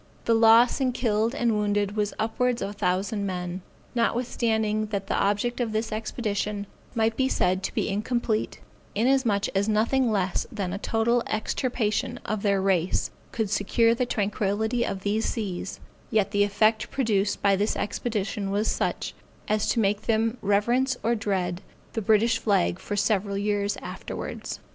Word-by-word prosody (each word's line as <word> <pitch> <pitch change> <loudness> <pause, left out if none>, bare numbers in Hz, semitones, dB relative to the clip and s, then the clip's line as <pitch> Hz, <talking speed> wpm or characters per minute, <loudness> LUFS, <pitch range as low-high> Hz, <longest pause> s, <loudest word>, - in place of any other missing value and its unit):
The 230 - +3
loss 230 +3 +6
in 255 -2 +1
killed 230 0 +1
and 235 -4 +1
wounded 205 -1 0
was 210 -1 0
upwards 240 +2 0
of 200 - -3
a - - -8
thousand 200 +2 -1
men. 180 0 -4 0.3
Notwithstanding 225 -3 0
that 200 -2 -3
the - - -2
object 205 +5 0
of 225 -3 -1
this 220 +1 -1
expedition 210 -2 -2 0.3
might 225 0 +2
be 265 +1 +2
said 185 -4 +1
to 195 - -3
be - - 0
incomplete, 215 +2 -1 0.3
inasmuch 230 -3 +2
as 200 +2 0
nothing 230 +4 +2
less 190 -3 0
than 195 -5 -3
a 200 - -3
total 230 +3 +1
extirpation 240 +2 -1
of 210 0 -2
their 200 -2 +2
race 190 -2 +1 0.2
could 220 -4 -2
secure 230 +3 +3
the 245 +1 -1
tranquility 210 +2 0
of 195 -4 -3
these 210 +3 0
seas, 195 -4 -3 0.3
yet 205 -3 +1
the 205 -1 +3
effect 215 +2 +2
produced 210 -6 0
by 200 -1 +5
this 205 +3 0
expedition 205 -2 -2
was 205 +2 0
such, - - -1 0.3
as 215 0 +1
to - - +2
make 205 -1 +1
them 225 +2 +1
reverence 240 +6 +2
or 230 +2 +2
dread 190 -5 -1 0.3
the 225 - -1
British 220 +2 +3
flag 85 - +1
for 205 - -4
several 200 -1 +1
years 205 0 0
afterwards. - - -6
215 Hz, 160 wpm, -26 LUFS, 200-230 Hz, 0.3 s, loss